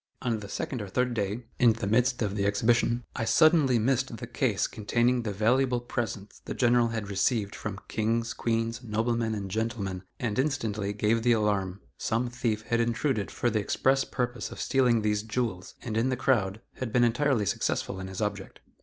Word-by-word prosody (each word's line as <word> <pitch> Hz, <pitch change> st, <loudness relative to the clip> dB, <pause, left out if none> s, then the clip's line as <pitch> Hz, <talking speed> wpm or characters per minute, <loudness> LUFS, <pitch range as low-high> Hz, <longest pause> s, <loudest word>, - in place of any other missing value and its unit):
On 115 Hz, -3 st, 0 dB
the 100 Hz, -1 st, -9 dB
second 125 Hz, +3 st, -3 dB
or 105 Hz, -, -5 dB
third 125 Hz, +5 st, 0 dB
day, 105 Hz, +1 st, -2 dB, 0.2 s
in 120 Hz, -2 st, +6 dB
the 110 Hz, -2 st, -4 dB
midst 125 Hz, +4 st, +2 dB
of 100 Hz, -1 st, -2 dB
the 100 Hz, -1 st, +1 dB
exhibition, 115 Hz, +3 st, +2 dB
I -, -, -1 dB
suddenly 155 Hz, -3 st, +5 dB
missed 125 Hz, +1 st, 0 dB
the -, -, -6 dB
case -, -, 0 dB
containing 120 Hz, +3 st, +1 dB
the 110 Hz, -3 st, -3 dB
valuable 120 Hz, +5 st, +2 dB
presents 110 Hz, -4 st, -4 dB
the -, -, -5 dB
General 120 Hz, -1 st, +4 dB
had 110 Hz, -3 st, -3 dB
received 100 Hz, +1 st, 0 dB
from 105 Hz, -2 st, -5 dB
kings, 115 Hz, +2 st, 0 dB
queens, 115 Hz, +1 st, -1 dB
noblemen 115 Hz, 0 st, 0 dB
and 100 Hz, -2 st, -5 dB
gentlemen, 105 Hz, -4 st, -2 dB, 0.2 s
and 115 Hz, -1 st, -1 dB
instantly 115 Hz, -8 st, -1 dB
gave 105 Hz, +2 st, +1 dB
the 120 Hz, +1 st, +4 dB
alarm; 100 Hz, -3 st, 0 dB, 0.2 s
some 120 Hz, +2 st, -1 dB
thief 110 Hz, -3 st, -1 dB
had 115 Hz, +1 st, 0 dB
intruded 120 Hz, -2 st, 0 dB
for 120 Hz, -, -1 dB
the 110 Hz, -, +1 dB
express 135 Hz, +6 st, +2 dB
purpose 125 Hz, -1 st, -3 dB
of -, -, -9 dB
stealing 125 Hz, -5 st, +2 dB
these 105 Hz, -1 st, +1 dB
jewels, 110 Hz, -4 st, -3 dB
and, 115 Hz, -4 st, -4 dB
in 115 Hz, +4 st, +2 dB
the 130 Hz, -, -1 dB
crowd, 110 Hz, -6 st, +1 dB, 0.2 s
had 130 Hz, -4 st, -4 dB
been 120 Hz, +1 st, +3 dB
entirely 120 Hz, -1 st, +2 dB
successful 95 Hz, -, -1 dB
in 95 Hz, -, -5 dB
his 95 Hz, +1 st, -6 dB
object. 105 Hz, -2 st, -3 dB
115 Hz, 190 wpm, -28 LUFS, 105-125 Hz, 0.2 s, in